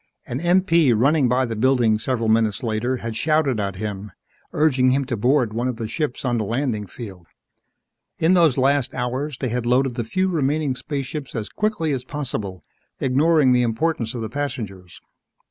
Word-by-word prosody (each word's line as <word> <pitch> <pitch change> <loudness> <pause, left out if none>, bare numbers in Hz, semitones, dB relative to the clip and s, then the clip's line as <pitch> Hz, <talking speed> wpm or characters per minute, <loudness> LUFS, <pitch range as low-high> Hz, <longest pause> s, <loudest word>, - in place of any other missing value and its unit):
An 125 - -4
MP 170 - +3
running 140 +2 +3
by 130 +2 +2
the 115 -2 -4
building 115 -2 +2
several 115 -1 -1
minutes 110 -1 +2
later 120 +3 -1
had 115 -2 -5
shouted 145 -2 +1
at 100 -2 -2
him, 105 0 -5 0.4
urging 130 -4 +3
him 135 +1 +1
to 125 -2 -2
board 120 0 +2
one 120 +3 -1
of 125 - -2
the 115 -1 -4
ships 145 +1 -3
on 120 -2 +1
the - - 0
landing 115 -2 -2
field. 95 -5 -10 0.9
In 165 +3 +3
those 165 -7 +4
last 135 0 +1
hours, 130 +3 -3
they 130 - -2
had 120 0 -2
loaded 130 +1 +2
the 120 -1 -3
few 185 +12 0
remaining 150 -4 0
spaceships 140 +1 -5
as 110 -2 -3
quickly 210 -7 -1
as 130 -3 -2
possible, 120 - -4 0.4
ignoring 145 +1 +3
the 125 0 +4
importance 120 0 -1
of 120 - -4
the - - -2
passengers. 105 -10 -5
125 Hz, 180 wpm, -22 LUFS, 115-145 Hz, 0.9 s, those